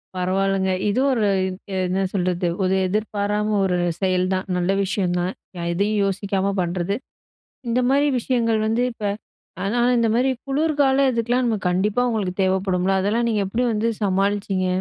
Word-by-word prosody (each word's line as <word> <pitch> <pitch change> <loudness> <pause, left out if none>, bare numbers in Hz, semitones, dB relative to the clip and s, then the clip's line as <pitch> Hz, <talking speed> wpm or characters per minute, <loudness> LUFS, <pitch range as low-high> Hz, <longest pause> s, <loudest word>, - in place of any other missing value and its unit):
பரவால்லங்க. 190 +1 0 0.2
இதுவும் 265 +6 +2
ஒரு 220 -4 +1 0.2
இத் 185 0 -6 0.3
என்ன 190 +2 0
சொல்றது, 180 -2 0 0.2
ஒரு 185 +1 +2
எதிர்பாராம 210 +1 -1
ஒரு 180 -1 +1 0.2
செயல் 185 -1 +2
தான். 185 +1 -2
நல்ல 180 +1 +1
விஷயம் 185 -2 -1
தான். 180 +2 -1 0.2
ய 170 - -4
எதையும் 205 +3 +1
யோசிக்காம 195 0 -1
பண்றது. 175 +2 -1 0.7
இந்த 235 +2 +1
மாரி 285 +2 +3
விஷயங்கள் 230 -2 +1
வந்து 225 +2 +1
இப்ப 225 - -11 0.6
ஆனா 215 +5 0 0.2
இந்த 230 - +2
மாரி 250 +3 +2 0.2
குளுர்கால 280 -2 +2
இதுக்கலாம் 240 +2 0
நம்ம 225 -2 +1
கண்டிப்பா 200 +6 +1
உங்களுக்கு 200 -6 -2
தேவப்படும்ல! 190 0 +1
அதெல்லாம் 225 +5 +1
நீங்க 210 -2 +1
எப்டி 225 +6 -1
வந்து 220 +2 0
சமாளிச்சிங்க? 195 -1 0
200 Hz, 150 wpm, -22 LUFS, 185-230 Hz, 0.7 s, மாரி